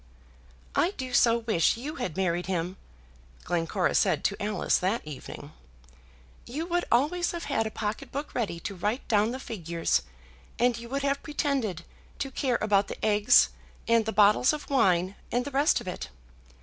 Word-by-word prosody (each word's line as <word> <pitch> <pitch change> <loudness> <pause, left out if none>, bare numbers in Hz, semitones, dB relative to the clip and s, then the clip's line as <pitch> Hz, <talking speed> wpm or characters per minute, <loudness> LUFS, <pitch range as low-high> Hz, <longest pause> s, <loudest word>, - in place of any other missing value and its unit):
"I 370 +4 +2
do 255 -2 -5
so 235 -1 +5
wish 225 -5 +1
you 290 +6 -6
had 190 - -4
married 175 -2 0
him!" 180 0 -2 0.7
Glencora 175 +2 0
said - - +2
to 200 - -1
Alice 205 -2 +1
that 195 +3 -1
evening. 150 -3 -9 1.0
"You 295 +7 -4
would 350 0 0
always 310 +10 +2
have 340 -1 -4
had 225 0 0
a - - -3
pocket 215 0 -4
book 285 +2 -5
ready 200 -8 -2
to 200 - -4
write 210 +7 -2
down 215 -1 +3
the 255 +2 -4
figures, 170 - -1 0.6
and 245 0 +3
you 235 0 -8
would 275 +2 -2
have 280 0 0
pretended 275 - -1 0.3
to 270 - -4
care 255 -2 0
about 205 -2 +3
the - - -5
eggs, 210 -1 +5 0.4
and 230 -1 +3
the - - 0
bottles 210 +6 +5
of 300 -1 -6
wine, 190 -7 +2
and 245 +1 0
the 285 - -5
rest 280 +3 +3
of - - -10
it. 180 - -5
225 Hz, 175 wpm, -28 LUFS, 190-265 Hz, 1.0 s, so